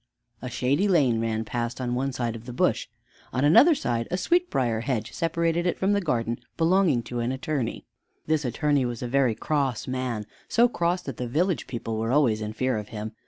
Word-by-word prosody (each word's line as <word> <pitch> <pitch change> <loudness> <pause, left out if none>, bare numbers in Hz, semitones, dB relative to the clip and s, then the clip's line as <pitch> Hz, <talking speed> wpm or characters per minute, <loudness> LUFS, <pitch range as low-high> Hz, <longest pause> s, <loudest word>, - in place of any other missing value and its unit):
A 125 - -5
shady 140 +11 +1
lane 135 - +3
ran 110 -1 -1
past 120 +2 -3
one 130 +2 -1
side 120 -3 -2
of 115 0 -10
the 125 - -6
bush. - - +1 0.4
On 130 +3 +1
another 290 - +7
side 120 - -1
a 180 - -1
sweetbrier 135 - +1
hedge 115 -3 -2
separated 170 +1 0
it 175 - 0
from 195 +2 +1
the 200 - +2
garden 120 - -1 0.2
belonging 165 -6 +3
to 120 +1 -5
an 120 +1 -1
attorney. 135 -2 -3 0.4
This 155 -1 +1
attorney 140 +3 +1
was 120 -1 -3
a - - -2
very 130 -2 +2
cross 140 -5 -1
man, 125 -4 -2 0.2
so 235 +1 +4
cross 175 -5 -1
that 135 -4 -6
the 125 - -3
village 165 +4 0
people 115 -3 -4
were 115 +1 -1
always 125 -7 +3
in 105 0 -4
fear 130 0 0
of 105 - -8
him. 110 -1 -6
130 Hz, 200 wpm, -26 LUFS, 115-160 Hz, 0.4 s, another